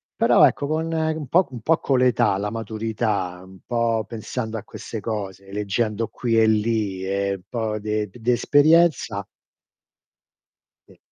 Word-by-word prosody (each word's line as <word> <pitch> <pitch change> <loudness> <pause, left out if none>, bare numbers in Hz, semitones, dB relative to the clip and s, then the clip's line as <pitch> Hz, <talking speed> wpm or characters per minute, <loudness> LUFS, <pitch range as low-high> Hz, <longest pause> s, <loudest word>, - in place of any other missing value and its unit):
però - - +5
ecco - - -2
con, 160 +2 -1
ehm, 160 0 0
un 150 - -6
po' 175 +8 +4
un 125 - -7
po' 160 +7 +3
con 135 -2 +1
l'età, 125 -6 +3
la 105 +1 -2
maturità, 110 -4 -2
un 95 0 -15
po' 115 -2 0
pensando 115 0 -5
a 105 - -7
queste 110 - -7
cose, 100 -2 -5
leggendo 105 +2 -1
qui 115 -2 0
e 110 - +5
lì 105 -3 0
e 100 +1 -1
un 95 - -12
po' 110 -2 -2
de 105 0 -2
d - - -15
di 120 +2 0
esperienza 145 -5 +3 1.6
Sì. - - -19
110 Hz, 160 wpm, -23 LUFS, 105-125 Hz, 1.6 s, però